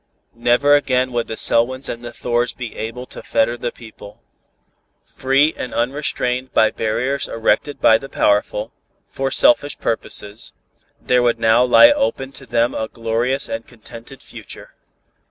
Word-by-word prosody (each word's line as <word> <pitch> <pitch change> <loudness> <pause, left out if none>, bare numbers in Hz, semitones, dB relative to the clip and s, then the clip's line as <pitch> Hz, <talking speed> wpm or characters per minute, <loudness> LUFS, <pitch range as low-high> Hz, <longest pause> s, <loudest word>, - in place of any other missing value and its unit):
Never 120 +5 +2
again 130 -3 +1
would 120 -1 -2
the 110 - -6
Selwyns 130 +3 +1
and 120 0 -6
the 120 - -7
Thors 120 0 -2
be 120 -3 -7
able 115 +3 -6
to - - -10
fetter 115 +1 0
the 120 0 -4
people. 110 -3 -14 0.9
Free 135 +4 +1
and 125 - -6
unrestrained 125 0 -2
by 110 -1 +4
barriers 125 +5 -2
erected 115 +5 -1
by 110 - +5
the 135 - -10
powerful, 105 +1 0 0.3
for 135 0 -3
selfish 145 +3 +2
purposes, 105 -1 -4 0.5
there 125 0 +2
would 120 -1 +2
now 115 +2 +4
lie 210 - +7
open 275 - -1
to 135 -1 -12
them 120 0 +1
a 110 - -3
glorious 115 +4 -2
and 115 0 -6
contented 120 +2 -13
future. - - -12
120 Hz, 150 wpm, -19 LUFS, 115-130 Hz, 0.9 s, lie